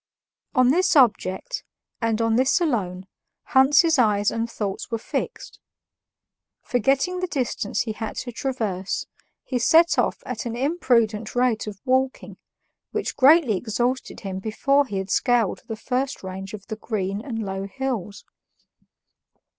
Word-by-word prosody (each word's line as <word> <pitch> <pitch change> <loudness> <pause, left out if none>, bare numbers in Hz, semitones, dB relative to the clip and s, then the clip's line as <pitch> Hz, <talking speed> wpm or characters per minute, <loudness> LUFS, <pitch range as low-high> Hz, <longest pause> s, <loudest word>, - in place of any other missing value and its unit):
On 255 -1 +5
this 350 +5 +3
object, 245 - +2 0.4
and 230 0 +1
on 225 0 +2
this 260 +7 +3
alone, 195 - -1 0.4
Hans's 290 +4 +4
eyes 210 -3 +3
and 230 0 -2
thoughts 205 -4 -4
were 230 - -1
fixed. 225 - -5 1.0
Forgetting 270 - +1
the 365 - -1
distance 255 - -2
he 225 - -3
had 220 +1 -5
to 245 - -5
traverse, 220 -7 -3 0.4
he 250 - -2
set 330 +8 +5
off - - 0
at - - -4
an 230 - -4
imprudent 240 -7 +1
rate 245 -3 +1
of 200 -2 -7
walking, 260 +1 0 0.5
which - - -3
greatly 280 -4 +5
exhausted 240 +5 -2
him 190 -2 -4
before 275 +7 +1
he 200 - -4
had 190 0 -4
scaled 240 -5 +2
the 225 - -4
first 255 +3 -2
range 190 +2 -6
of 200 -2 -12
the 220 - -6
green 200 -3 -3
and 250 -5 -5
low 195 0 -4
hills. 225 -4 -4
235 Hz, 140 wpm, -24 LUFS, 210-265 Hz, 1.0 s, On